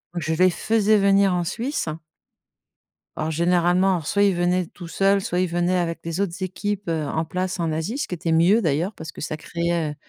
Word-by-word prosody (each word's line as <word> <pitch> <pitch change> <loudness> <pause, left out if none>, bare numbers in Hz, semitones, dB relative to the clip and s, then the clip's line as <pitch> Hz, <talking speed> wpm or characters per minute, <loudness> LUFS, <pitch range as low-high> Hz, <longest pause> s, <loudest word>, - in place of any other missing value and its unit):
Je 160 -2 -1
les 185 +3 +4
faisais 215 +3 +2
venir 195 -1 +4
en 175 -1 0
Suisse. 235 - -3 1.3
Alors, 155 - -2
généralement, 175 +3 +2
alors 170 -5 -2
soit 200 - +2
ils 200 -1 +4
venaient 175 0 +1
tout 175 -4 -11
seuls, 195 +3 +2
soit 180 -2 -1
ils 185 - +1
venaient 175 +1 0
avec 165 -1 -2
les 165 +3 -2
autres 190 0 -3
équipes, 205 +2 -3
heu, 160 -2 -1
en 160 +3 -2
place 185 +2 -3
en 165 - 0
Asie, 160 - -3
ce - - -2
qui 180 - -4
était 165 -1 -2
mieux 175 +8 +4
d'ailleurs 165 +3 0
parce 160 -4 -8
que - - -12
ça 155 - -3
créait, 170 0 -2
heu, 150 - -9
175 Hz, 215 wpm, -23 LUFS, 165-195 Hz, 1.3 s, les